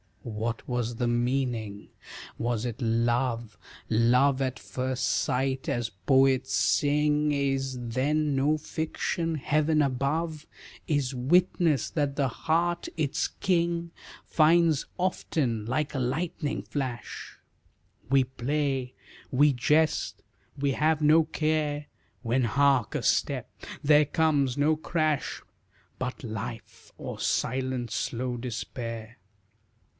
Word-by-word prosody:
What 115 0 -4
was 120 -1 -2
the 120 +1 -1
meaning 120 -4 -1 0.5
was 115 -2 -1
it 120 -1 -4
love? 115 -1 0 0.3
Love 125 +5 +3
at 130 -1 -1
first 130 0 -3
sight, 130 +1 0
as 120 -1 -1
poets 130 +4 +2
sing, 150 +8 +2
Is 135 -2 0
then 140 +5 0
no 145 +3 +2
fiction? 160 +2 -2
Heaven 155 +1 +2
above 150 +4 -1 0.4
Is 140 -4 0
witness, 155 +1 +2
that 145 -3 -1
the 140 -2 +1
heart 170 +6 0
its 150 -4 0
king 170 -2 0 0.3
Finds 160 -1 +3
often 145 - -1
like 145 +4 -1
a 135 - -2
lightning 150 +4 -2
flash; 130 -5 -5 0.7
We 135 0 +5
play, 130 0 -2 0.4
we 145 +2 +4
jest, 150 +5 +1 0.4
we 140 0 +1
have 155 +3 +1
no 155 +2 +5
care, 155 -2 -1 0.4
When 125 +2 +1
hark 135 -1 +2
a - - -1
step, - - +1 0.3
there 150 +1 +6
comes 145 -4 +1
no 150 +2 +3
crash, 155 -2 -1 0.6
But 130 +4 -4
life, 115 0 -7
or - - -6
silent 130 -2 -1
slow 125 +1 -2
despair. 115 -1 -6
135 Hz, 110 wpm, -27 LUFS, 120-150 Hz, 0.7 s, there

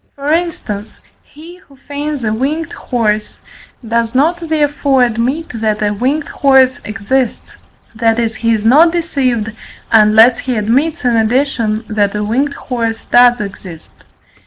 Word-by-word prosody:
For 285 +2 -1
instance, 265 -12 -4 0.2
he 330 +4 -14
who 325 -7 -21
feigns 285 0 -5
a 215 -1 0
winged 290 +7 -2
horse, 215 -4 -2 0.5
does 230 +1 -1
not 325 +6 +2
therefore 290 -5 +1
admit 245 +7 -1
that 215 -1 0
a 205 0 0
winged 270 +8 -1
horse 265 -2 +3
exists; 220 +4 -3 0.4
that 225 0 +1
is, 225 -2 -1
he 230 0 0
is 220 -1 -1
not 305 +8 +5
deceived, 260 -10 -1 0.4
unless 220 +2 +5
he 255 -2 -3
admits 255 +8 0
in 240 -1 +2
addition 230 -1 0
that 210 -2 0
a 210 - -2
winged 270 +7 -1
horse 230 -3 -4
does 245 0 +4
exist. 190 -5 -8
245 Hz, 140 wpm, -14 LUFS, 220-285 Hz, 0.5 s, not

